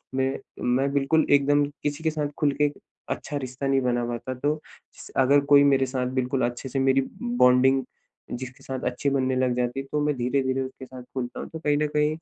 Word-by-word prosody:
मैं 130 0 0 0.4
मैं 135 +2 +1
बिल्कुल 145 +3 +2
एकदम 145 +1 +4 0.2
किसी 145 +2 -2
के 160 - +2
साथ 150 -1 -2
खुल 145 -2 +3
के 145 -1 +3 0.4
अच्छा 145 - -3
रिश्ता 130 +1 -4
नहीं 135 -1 +2
बना 120 -1 0
पाता। 120 +2 -4
तो 145 +4 -1 0.4
स - - -11
अगर 135 +2 +5
कोई 145 0 +7
मेरे 135 -1 +4
साथ 130 -1 -2
बिल्कुल 130 +1 0
अच्छे 120 +2 -4
से 135 +1 -2
मेरी 135 0 +3 0.2
बॉन्डिंग 135 - +4 0.5
जिसके 125 +1 -7
साथ 130 -1 -4
अच्छी 130 +3 0
बनने 130 -1 +1
लग 130 -1 +1
जाती 125 +2 -1
है, 135 - -5
तो 150 - 0
मैं 150 - +1
धीरे-धीरे 130 +1 0
उसके 130 0 -7
साथ 130 -1 -10
खुलता 125 -2 -4
हूँ। - - -5
तो 160 - -7
कहीं 150 -2 +1
न 150 0 +1
कहीं 150 +1 +2
135 Hz, 210 wpm, -25 LUFS, 130-145 Hz, 0.5 s, कोई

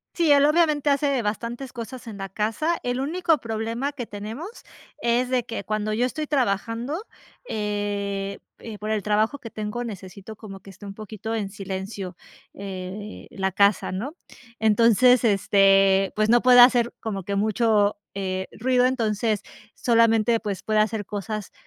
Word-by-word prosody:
Sí, 330 -4 +3
él 285 0 +6
obviamente 305 -2 +3
hace 280 -2 +2
bastantes 235 +5 -4
cosas 240 +1 -8
en 210 -2 -7
la 195 0 -6
casa. 225 - -1
El 245 +1 -1
único 325 +2 +1
problema 230 +4 -3
que 250 -4 -5
tenemos 220 - -7 0.5
es 240 +1 +1
de 255 -2 0
que 225 -3 -5
cuando 215 0 -2
yo 240 +3 +1
estoy 305 +4 -3
trabajando, 245 - -1 0.4
eh, 205 -2 -3 0.2
eh, 220 -2 -8
por 215 - -5
el 215 -2 0
trabajo 215 +7 +1
que 230 - -9
tengo, 215 +3 -4
necesito 200 0 -8
como 195 -3 -10
que 195 - -12
esté 205 +2 -13
un 195 - -7
poquito 220 +1 -5
en 205 -3 -2
silencio, 195 -2 -6 0.4
eh, 195 +1 -7
la 190 -1 -2
casa, 200 +2 +3
¿no? 235 - -4 0.4
Entonces 230 +3 +5
este 195 -2 +4
pues 215 0 +1
no 240 +1 +5
puede 250 -1 +7
hacer 245 -1 +6
como 200 -4 -4
que 200 +2 -3
mucho, 210 0 +2 0.2
eh, 190 -1 -3
ruido. 250 +1 +3
Entonces 220 -4 0 0.3
solamente 230 -1 +3
pues 200 -4 -4
puede 215 -1 +1
hacer 215 -1 0
cosas 210 0 -5
220 Hz, 160 wpm, -24 LUFS, 200-245 Hz, 0.5 s, puede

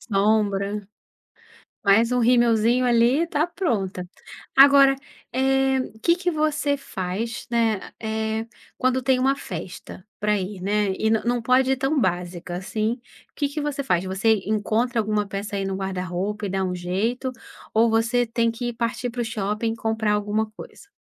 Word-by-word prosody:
Sombra. 205 -1 0 1.0
Mais 220 +4 +4
um 250 - +2
rimelzinho 235 0 +3
ali, 245 +7 +3
tá 310 -1 +1
pronta. 195 - -2 0.5
Agora, 275 0 +7 0.4
eh, 265 +1 +2 0.2
que 340 0 +4
que 355 0 -1
você 305 -2 +1
faz, 205 0 -4
né, 225 -4 +2 0.2
eh, 220 0 -2 0.3
quando 255 0 +1
tem 260 0 +3
uma 270 +2 +2
festa 180 -4 -8 0.2
para 210 0 +1
ir, 190 +1 -5
né, 205 -1 +1
e 220 - +1
nã 220 - +2
não 240 0 +1
pode 255 +2 +3
ir 265 - +1
tão 270 +2 +1
básica 175 -1 -2
assim. 215 +6 -2 0.4
Que 290 - 0
que 290 +2 -4
você 290 -1 -2
faz? 180 -8 +1
Você 200 +3 +1
encontra 220 +3 0
alguma 210 -1 0
peça 200 +1 -5
aí 195 - -2
no 195 - -2
guarda-roupa 190 +2 -3
e - - -5
dá 190 0 -1
um 180 -1 -1
jeito, 210 +9 -2 0.4
ou 225 +1 +4
você 230 +2 +2
tem 230 0 0
que 240 +1 -4
partir 240 +1 -2
para 240 0 -3
o - - -1
shopping 215 +1 -2
comprar 220 -2 0
alguma 210 +1 0
coisa? 400 - -12
225 Hz, 160 wpm, -23 LUFS, 200-255 Hz, 1.0 s, Agora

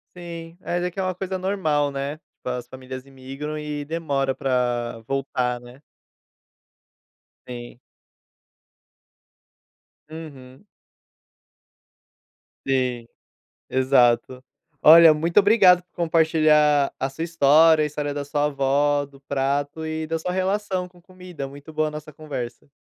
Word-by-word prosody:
Sim. 170 -1 -9
É, 175 - -2
até 180 0 -2
que 195 - -8
é - - 0
uma 185 -1 -2
coisa 190 0 -4
normal, 160 -7 0
né, 140 +2 -4
tipo, 155 - -17
as 125 -1 -4
famílias 130 0 -9
imigram 135 +3 -7
e 150 -1 -4
demora 140 -4 -2
pra 120 -3 -1
voltar, 130 -3 -1
né. 120 +3 -15 1.7
Sim. 120 -1 -9 2.3
Uhum. 140 -2 -11 2.0
Sim, 125 -3 0 0.6
exato. 130 -1 +2 0.4
Olha, 165 +1 +9
muito 165 +5 +1
obrigado 195 -4 +6
por 180 - -48
compartilhar 155 -3 +3
a 135 - -2
sua 135 +4 -7
história, 160 0 +5
a - - +1
história 145 -1 -4
da 145 0 -4
sua 145 +1 -1
avó, 145 +1 +1
do 140 -1 -17
prato 140 +3 -2
e 160 0 -3
da 165 +1 -2
sua 180 +3 -3
relação 190 0 -1
com 180 0 -21
comida. 180 -5 -9
Muito 145 +3 -12
boa 155 0 0
a - - -6
nossa 150 0 -9
conversa. 135 -5 -7
150 Hz, 125 wpm, -23 LUFS, 135-165 Hz, 2.3 s, Olha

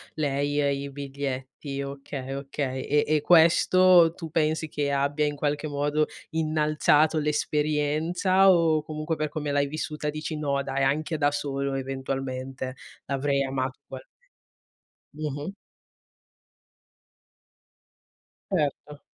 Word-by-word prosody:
lei, 145 -1 0
ehm, 140 -1 +2
i 140 0 -5
biglietti, 140 0 -5
okay, 140 -1 -6
okay. 135 -1 -3
E 145 +1 +2
e 155 0 +2
questo 170 +1 +6
tu 165 -3 -7
pensi 160 0 +1
che 145 -1 -2
abbia 140 +2 +1
in 145 0 -1
qualche 145 +1 -1
modo 145 +1 0 0.2
innalzato 155 0 +2
l'esperienza, 155 +5 +2
o 165 -3 +3
comunque 155 +1 -3
per 155 -1 -2
come 145 -1 -3
l'hai 140 0 +2
vissuta 150 0 -4
dici: 155 +1 -4
"No, 140 -2 -1
dai, 135 0 -1
anche 155 +4 0
da 145 -1 +2
solo 140 -1 -2
eventualmente, 130 -1 -4 0.3
l'avrei 140 0 0
amato 130 -1 -3
ugualme" - - -10 1.1
Mh-mh. 150 +4 -4 3.0
Certo. 150 -4 -2
145 Hz, 115 wpm, -26 LUFS, 140-155 Hz, 3.0 s, questo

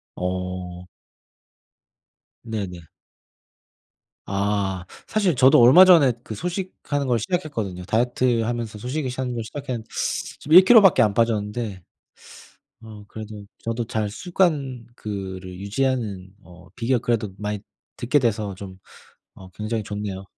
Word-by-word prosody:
어. 90 -1 -4 1.6
네네. 95 -7 -5 1.4
아. 100 -2 -1 0.2
사실 200 -7 +1
저도 130 +2 +6
얼마 130 +10 +9
전에 160 -9 +6
그 110 - -7
소식하는 175 - -3
걸 120 -2 +2
시작했거든요. 110 - -3
다이어트하면서 120 0 0
소식을 130 +5 -3
하는 130 -2 -2
걸 115 - -3
시작했는데 125 -2 -6 0.5
지금 150 - -2
1 185 - +10
킬로 230 +1 +8
밖에 195 -5 +5
안 105 -2 +3
빠졌는데 105 -2 -1 1.0
어 110 -2 -11
그래도 105 -1 -9
저도 115 +1 -3
잘 110 -1 -2
습관 140 - -1
그거를 95 -4 -6
유지하는 100 -3 -2
어 90 0 -16
비결 120 +1 +1
그래도 110 -4 -1
많이 105 0 -3 0.4
듣게 130 +4 +2
돼서 105 -5 -1
좀 95 -1 -10 0.6
어 95 - -12
굉장히 105 +4 -3
좋네요. 100 -1 -5
110 Hz, 260 characters per minute, -23 LUFS, 100-130 Hz, 1.6 s, 1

